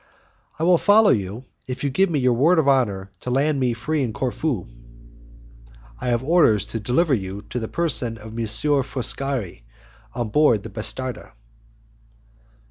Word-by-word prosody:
"I 160 - -3
will 175 0 +4
follow 210 +1 +5
you, 105 +3 -2 0.2
if 130 +1 -5
you 140 - +1
will - - -13
give 190 +6 +3
me 160 - 0
your 125 -2 +2
word 155 +9 +3
of 155 -3 +2
honour 100 -8 +1
to - - -5
land 140 +3 +1
me 125 -2 +1
free 150 +7 -2
in 115 -4 -3
Corfu." 130 - -2 1.3
"I - - -5
have 120 0 0
orders 145 - +3
to 115 - -4
deliver 130 +9 +1
your 100 -3 -3
person 125 0 -2
to 110 - -14
M. 115 +6 0
Foscari, 130 - -2 0.5
on 120 -3 -2
board 120 -5 +3
the 115 - -8
bastarda." 120 +3 -5
125 Hz, 155 wpm, -22 LUFS, 110-150 Hz, 1.3 s, follow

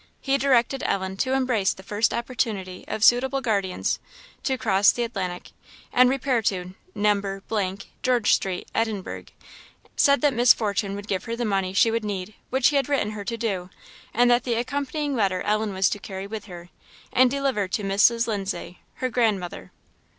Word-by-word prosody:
He 275 0 0
directed 265 -1 +2
Ellen 190 -1 -1
to 260 +5 0
embrace 250 -7 +1
the 190 - -13
first 210 +3 +1
opportunity 220 -7 -3
of 215 - -3
suitable 260 +3 +4
guardians, 200 -7 -1 0.4
to 265 -1 -1
cross 200 -5 +4
the 240 - -2
Atlantic, 190 -6 -4 0.4
and 250 0 +6
repair 260 -2 +1
to 185 -3 -2 0.2
No., 205 -1 +2 0.8
Georgestreet, 215 -7 +1
Edinburgh; 220 -4 -2 0.7
said 280 0 +4
that 290 -2 +3
Miss 245 +1 +6
Fortune 200 -2 -1
would 205 0 -8
give 190 -3 -2
her 230 -1 -3
the 240 0 -2
money 195 -3 0
she 225 +4 +4
would 230 0 -1
need, 205 -1 -4 0.2
which 260 0 +3
he 290 - +1
had 275 0 0
written 275 -7 +1
to - - -6
her 205 -1 -6
to 230 - -3
do, 195 -6 -2 0.4
and 245 +1 +4
that 240 +1 +3
the 240 -2 -1
accompanying 285 +4 -2
letter 195 -5 +1
Ellen 215 0 0
was 190 -1 +2
to 205 - -2
carry 190 -1 -6
with 215 +1 -6
her, 175 -3 -10 0.4
and 255 0 +5
deliver 265 -7 0
to 205 +3 -2
Mrs. 210 +4 +3
Lindsay, 195 -5 -4 0.3
her - - +1
grandmother. 215 -7 -1
220 Hz, 175 wpm, -24 LUFS, 195-250 Hz, 0.8 s, and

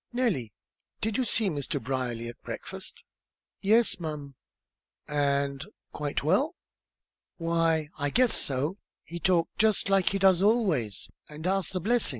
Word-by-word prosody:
"Nellie, 220 - 0 0.5
did 220 -1 -1
you 260 - +2
see 220 -1 +2
Mr. 145 -7 -2
Brierly 120 -2 -3
at 120 - -9
breakfast?" - - -7 0.6
"Yes'm!" 165 -10 +1 0.7
"And 140 -1 0 0.3
quite 145 -2 -2
well?" 265 - +2 0.8
"Why 165 -2 +1
I 145 0 +1
guess 245 - +4
so. 145 +8 +1 0.2
He 170 +2 -7
talked 175 -1 +1
just 215 -2 +2
like 195 -2 +4
he 195 - 0
does 190 -2 +4
always, 190 - +1 0.2
and 150 +2 -9
asked 190 -1 0
the 185 - 0
blessin'. 235 +6 +2
165 Hz, 135 wpm, -28 LUFS, 140-200 Hz, 0.8 s, guess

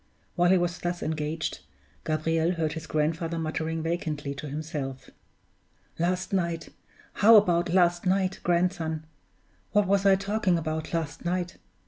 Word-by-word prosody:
While 175 0 +3
he 190 - +6
was 175 -1 -1
thus 175 0 -3
engaged, 155 0 -2 0.5
Gabriel 165 +2 +1
heard 160 -3 -1
his 160 0 -7
grandfather 165 +2 -1
muttering 160 0 -2
vacantly 155 -4 -2
to 145 +1 -7
himself, 145 -3 -5 0.9
"Last 180 +3 0
night 170 -3 -1 0.4
how 225 +3 +7
about 175 -5 +4
last 175 0 +3
night, 190 0 +1
grandson? 170 -3 0 0.7
What 205 -1 +4
was 200 +1 +2
I 195 - +7
talking 200 -2 +1
about 155 -1 -3
last 160 -4 -3
night? 175 0 -2
170 Hz, 135 wpm, -27 LUFS, 155-180 Hz, 0.9 s, how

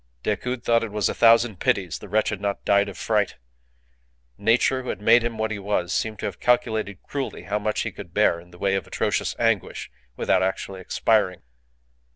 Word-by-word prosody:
Decoud 120 +4 -2
thought 115 0 +3
that 115 - -3
it - - -12
was 105 -2 0
a - - -1
thousand 115 -3 +4
pities 90 -4 0
the 105 - -11
wretch 110 +2 +2
had 105 -2 -4
not 100 -1 -3
died 100 0 +3
of 95 - -10
fright. 105 -1 0 1.0
Nature, 120 - +2
who 125 - -7
had - - -3
made 115 +3 +5
him 115 -1 -3
what 110 0 -1
he 105 - -3
was, 95 -3 -1
seemed 110 -1 -1
to - - -5
have 95 - -5
calculated 110 -5 0
cruelly 140 -2 -5
how 105 +1 -2
much 105 0 -1
he - - -3
could 90 -4 -10
bear 90 -3 +2
in 90 +1 -16
the 90 - -15
way 100 +1 0
of 95 - -2
atrocious - - -1
anguish - - -1 0.3
without - - +2
actually 95 0 -2
expiring. 95 -1 +1
105 Hz, 205 wpm, -24 LUFS, 95-115 Hz, 1.0 s, made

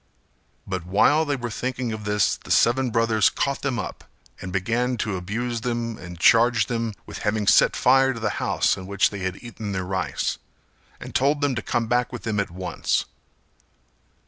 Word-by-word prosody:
But 95 -3 -4
while 125 - +3
they 145 -1 0
were 120 -3 -5
thinking 125 +1 -3
of 105 -1 -7
this 105 -2 +2
the - - -15
seven 125 +2 +3
brothers 115 -2 +3
caught 140 0 -2
them 135 -4 -1
up, - - -5 0.4
and 95 - -6
began 115 +7 0
to 105 -3 -2
abuse 115 +6 -3
them 120 -1 -3
and 85 -1 -9
charge 115 +1 +5
them 115 -2 -3
with - - -8
having 105 0 -1
set - - +5
fire 135 +1 +4
to 120 - -6
the 110 - -1
house - - +2
in 95 - -9
which 100 0 +2
they 100 - -6
had 95 +2 -4
eaten 110 -4 -6
their 95 -1 -2
rice, 95 0 -2 0.6
and - - -9
told 145 +3 +2
them 145 -2 +1
to 120 - -2
come 120 +2 -1
back 120 +1 0
with 125 - -7
them 110 -2 -1
at 100 - -1
once. 90 0 -2
115 Hz, 190 wpm, -24 LUFS, 100-125 Hz, 0.6 s, charge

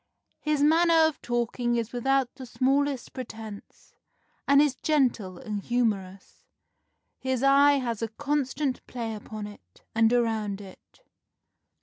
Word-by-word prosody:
His 300 -1 0
manner 325 +1 +5
of 315 - -5
talking 240 0 -1
is 235 0 -2
without 265 +1 +1
the 260 -2 -10
smallest 270 +1 0
pretence, 220 -5 -9 0.5
and 280 0 +6
is 290 -2 +4
gentle 250 - 0
and 210 +2 -5
humorous. 200 -5 -2 0.8
His 260 -1 -1
eye 280 +1 +6
has 240 -5 -2
a 225 - 0
constant 280 +2 -2
play 230 -3 -4
upon 215 0 -7
it, 205 0 -14
and 225 0 +4
around 220 -4 0
it. 195 - -15
245 Hz, 125 wpm, -27 LUFS, 220-280 Hz, 0.8 s, and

